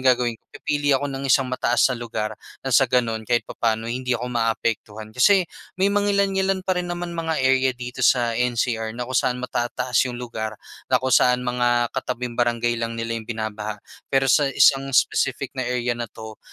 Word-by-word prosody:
gagawin 125 -3 +2
ko, - - -50
pipili 145 -2 0
ako 145 0 -3
ng 135 0 -4
isang 135 +1 +4
mataas 125 -2 +1
na 120 - -5
lugar 110 -2 -3 0.3
nang 135 - -2
sa 135 0 +5
gano'n, 115 -3 +1
kahit 120 -1 +2
papaano 115 -1 -1
hindi 125 +1 -1
ako 125 +1 -5
maaapektuhan. 110 -2 -2
Kasi, 185 - +4 0.3
may 195 +2 +2
mangilan-ngilan 195 -2 +1
pa 185 - +1
rin 175 - -5
naman 175 0 -4
mga 165 -1 -2
area 130 -1 +2
dito 125 +1 -7
sa 120 -2 +3
NCR 115 -1 -1
na 125 - -3
kung 130 - -7
saan 125 0 +1
matataas 125 +1 0
yung 120 - -5
lugar, 110 -3 -5 0.3
na 130 -1 +2
kung 130 - 0
saan 125 0 +4
mga 120 -1 +1
katabing 125 -2 -4
barangay 120 -1 +1
lang 115 0 -3
nila 115 0 -3
yung 110 - -11
binabaha. 110 -2 -4 0.3
Pero 135 -1 +2
sa 145 +2 +4
isang 135 0 +5
specific 135 0 +1
na 130 - -1
area 125 -1 -1
na 120 - -3
'to 110 0 -11
125 Hz, 190 wpm, -23 LUFS, 115-135 Hz, 0.3 s, sa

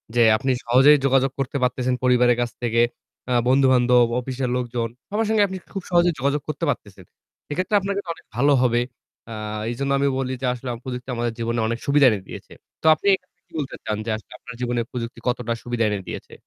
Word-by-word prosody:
যেই 115 -2 +6
আপনি 130 +2 0
সহজেই 135 +5 +6
যোগাযোগ 135 0 +3
করতে 135 +1 -1
পারতেছেন 125 0 0
পরিবারের 125 -1 +4
কাছ 120 - -1
থেকে। 115 0 +2 0.5
আ - - +3
বন্ধু-বান্ধব, 125 -2 +4
অফিসের 130 0 -3
লোকজন। 120 -2 -2 0.2
সবার 215 +1 0
সঙ্গে 215 -2 +4
আপনি 190 0 -5 0.2
খুব 195 -2 -4
সহজেই 175 -1 +4
যোগাযোগ 140 +2 0
করতে 155 +3 -4
পারতেছেন। 95 -8 -5 0.5
এক্ষেত্রে 185 +7 0
আপনাকে 200 +1 -2
তো - - -10
অনেক - - -19
ভালো 140 +3 +4
হবে। 120 -1 +3 0.5
আ - - -6 0.4
এজন্য 140 +3 -2
আমি 140 - +2
বলি 130 -1 -2
যে - - -1
আসলে 125 +1 -7
আম 115 - -8
প্রযুক্তি 125 0 -6
আমাদের 120 -1 -1
জীবনে 115 0 -1
অনেক 115 0 -2
সুবিধা 140 0 +4
এনে 105 -3 0
দিয়েছে। - - -10 0.3
তো - - -12
আপনি 200 - -5
এক্ষেত্রে 185 -1 -5
কি - - -40
বলতে 140 - -4
চান 105 - -1
যে - - -4 0.3
আপনার 125 - -10
জীবনে 120 -1 0
প্রযুক্তি 120 -1 -5
কতটা 120 -1 0
সুবিধা 120 -1 -1
এনে 105 -1 -2
দিয়েছে? - - -7
125 Hz, 200 wpm, -23 LUFS, 120-140 Hz, 0.5 s, যেই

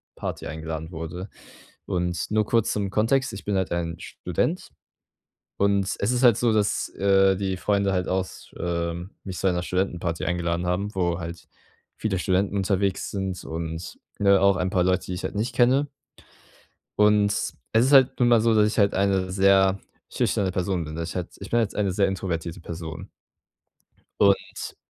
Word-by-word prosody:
Party - - -5
eingeladen 80 +1 -5
wurde. 85 +3 -6 0.6
Und 90 -2 -2
nur 110 0 +2
kurz 115 0 +1
zum 100 -2 -2
Kontext, 115 +6 +1
ich 100 - -7
bin 105 - -1
halt 95 -1 -1
ein 85 -1 -2
Student - - -3 0.9
und 100 -1 +2
es 100 - +1
ist 125 +1 +1
halt 120 -4 +7
so, 120 -1 +2
dass, 105 -1 +1
äh, 95 -1 +4
die 95 -1 -2
Freunde 100 +1 +1
halt 90 -1 -1
aus 95 -1 -3
äh, 85 -1 -2 0.3
mich 95 -3 -6
zu - - -1
einer 90 -1 0
Studentenparty 90 -2 -2
eingeladen 85 0 -1
haben, 100 +4 -1
wo 85 -2 0
halt 85 0 -7 0.5
viele 100 -4 -1
Studenten 95 +2 0
unterwegs 95 0 0
sind 95 -2 -3
und 80 +1 -5 0.2
ne, 100 -1 +5
auch 100 -1 +4
ein 90 +1 0
paar 90 -3 +2
Leute, 90 0 +1
die 90 - -4
ich 90 - -6
halt - - -3
nicht 110 +5 -2
kenne. 130 +4 +3 1.1
Und 105 0 +5
es - - -2 0.2
ist 120 +5 +4
halt 130 -2 +6
nun 125 - +4
mal 120 -2 +5
so, 115 0 +3
dass 105 -1 +4
ich 105 - -3
halt 100 -2 +3
eine 95 -1 +1
sehr 95 0 +4 0.3
schüchterne 95 -3 0
Person 90 -1 -1
bin. 80 0 -7
Das 85 +1 -4
ich - - -9
halt 90 -2 -3
ich - - -8
bin 120 - +3
jetzt 110 - -2
eine 100 -3 0
sehr 100 +1 +2
introvertierte 90 -2 -4
Person. 80 -1 -7 1.1
Und 100 -1 +1
95 Hz, 180 wpm, -25 LUFS, 90-100 Hz, 1.1 s, halt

